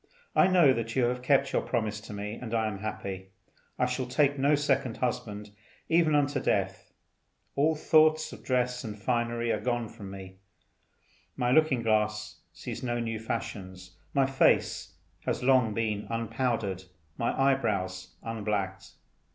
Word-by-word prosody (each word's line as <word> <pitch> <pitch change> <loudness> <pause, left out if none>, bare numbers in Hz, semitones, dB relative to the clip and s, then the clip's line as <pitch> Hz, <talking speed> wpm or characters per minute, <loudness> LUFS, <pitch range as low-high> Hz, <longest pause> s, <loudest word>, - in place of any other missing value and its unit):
I 185 - +6
know 175 -8 +6
that 115 -2 -3
you 130 - +3
have 125 +1 0
kept 140 +1 +2
your - - +2
promise 105 -3 -2
to 105 - -10
me, 105 0 -4
and 115 0 -5
I 110 -1 +2
am 105 -3 -3
happy. 95 -3 -5 0.5
I - - +2
shall 125 0 -2
take 140 +2 +2
no 145 +2 +3
second 135 -4 0
husband, 105 -4 -3 0.4
even 165 -2 +4
unto 145 -1 +2
death. 95 -6 -1 0.6
All 155 +3 +3
thoughts 155 0 +4
of - - -11
dress 125 -1 0
and 105 -2 -6
finery 120 +1 0
are - - 0
gone 120 -2 -1
from 105 -4 -10
me; 95 -1 -9 1.0
my 125 0 +1
looking 145 -4 +3
glass 105 -1 0
sees - - -7
no 120 -1 -1
new 115 -1 -2
fashions; 95 -6 -5 0.2
my 135 -1 +3
face 135 0 +2 0.3
has - - -1
long 125 -5 +4
been 110 -2 -1
unpowdered, 115 -4 -1 0.3
my 115 - -1
eyebrows 105 -9 0
unblacked. 105 -4 -3
115 Hz, 150 wpm, -29 LUFS, 105-135 Hz, 1.0 s, I